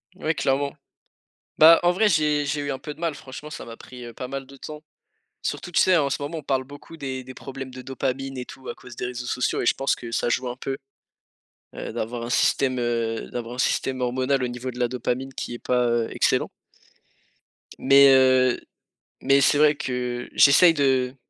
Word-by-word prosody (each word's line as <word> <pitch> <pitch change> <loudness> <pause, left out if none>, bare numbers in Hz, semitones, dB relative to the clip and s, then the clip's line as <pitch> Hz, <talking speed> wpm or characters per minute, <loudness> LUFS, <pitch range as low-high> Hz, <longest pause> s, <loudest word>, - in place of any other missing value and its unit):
Ouais, 165 -4 -2
clairement. 140 +1 0 0.8
Bah, 165 +2 +8
en 175 - +5
vrai, 210 +4 +2
j'ai 150 -3 +2
j'ai 145 +1 -2
eu 145 0 -3
un 135 - -3
peu 150 - -7
de - - -21
mal 165 -2 -1
franchement, 135 +2 -10
ça - - -8
m'a 115 - -9
pris, 125 -1 -11
heu, 120 - -9
pas 125 - -6
mal 135 +1 -5
de 135 +1 -15
temps. 150 +2 -9 0.6
Surtout, 175 - -4
tu - - +2
sais? 185 -1 +5
En 145 -3 +1
ce 140 - -3
moment, 145 +4 -4
on - - -12
parle 135 -1 0
beaucoup 145 +4 -12
des 130 -3 -5
des 130 - -9
problèmes 135 0 -8
de 130 0 -9
dopamine 135 +1 -4
et 125 - -5
tout 130 +1 -12
à - - -5
cause 125 -1 -13
des - - -4
réseaux 125 0 -5
sociaux 125 +1 -1
et - - -2
je - - +4
pense 135 - 0
que 120 -1 -9
ça 120 - 0
joue 125 +2 0
un 120 - -4
peu, 135 +1 -4 1.0
heu, - - -6
d'avoir 115 +1 -4
un 120 - -5
système, 130 +1 +2
heu, 115 -2 -2
d'avoir 120 0 -5
un - - -13
système 130 0 0
hormonal 130 +2 0
au - - -1
niveau 120 +1 -5
de 125 - -11
la 125 - +2
dopamine 125 +2 -3
qui 120 - -5
est - - -7
pas, 125 0 +1
heu, 115 -1 +1
excellent. - - +1 1.3
Mais 140 +1 +7
heu, 130 -1 +4 0.6
mais 140 0 +4
c'est 140 - +4
vrai 150 0 +5
que 125 -2 -4
j'essaye 165 +5 +7
de 130 -3 +1
130 Hz, 215 wpm, -24 LUFS, 125-140 Hz, 1.3 s, Bah